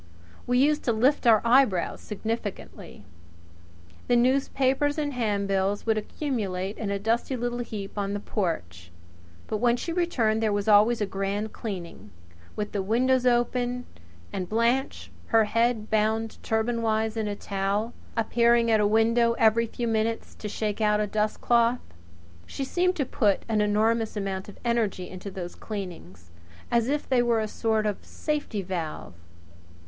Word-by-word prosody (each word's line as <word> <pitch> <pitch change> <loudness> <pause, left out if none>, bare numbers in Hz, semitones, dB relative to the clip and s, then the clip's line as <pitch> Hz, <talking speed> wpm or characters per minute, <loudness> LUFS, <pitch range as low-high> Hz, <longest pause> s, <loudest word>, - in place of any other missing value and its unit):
We 245 0 +2
used 295 +3 +3
to 235 - +2
lift 250 +4 +2
our 220 -2 +6
eyebrows 235 -7 +3
significantly. 210 - -6 1.0
The 245 - +3
newspapers 270 +3 +2
and 295 -2 -1
handbills 200 -4 0
would 220 -1 +2
accumulate 210 -5 -3
in 215 - -3
a 200 - 0
dusty 230 +6 0
little 240 0 -2
heap 210 -5 -6
on 200 0 -2
the 205 - -2
porch; 90 - -3 0.6
but 215 - -2
when 240 +2 +2
she 335 - -4
returned 240 -11 +1
there 220 -1 +1
was 205 +1 -1
always 215 +2 +5
a - - +2
grand 195 +2 -3
cleaning, 170 - -7 0.5
with 210 -1 -3
the 200 - -1
windows 250 +5 +2
open, 245 0 +1 0.5
and 185 -2 -3
Blanche 235 +5 0 0.2
her 225 -1 +4
head 230 0 0
bound 220 +1 0
turbanwise 220 -1 0
in 220 -1 -1
a 205 - -2
towel 200 +3 -2 0.2
appearing 235 +1 +3
at 220 - +4
a 210 - +3
window 230 +2 +3
every 230 0 +3
few 235 +1 -4
minutes 225 0 -1
to 210 - -7
shake 210 +1 -3
out 210 -1 +3
a 210 - +1
dustcloth. 230 +3 +1 0.7
She 275 - -4
seemed 360 +6 +1
to 280 - 0
put 205 -5 +1
an 220 -2 +1
enormous 220 +2 +1
amount 195 -1 -3
of 205 - -12
energy 220 -6 0
into 185 +2 -8
those 180 -2 -6
cleanings 170 - -8 0.4
as 235 -1 +2
if 295 +1 -1
they 255 -2 +3
were 235 -2 +2
a 215 - -1
sort 220 0 0
of 210 -2 -2
safety 290 -10 -3
valve. 170 - -5
220 Hz, 155 wpm, -26 LUFS, 205-240 Hz, 1.0 s, our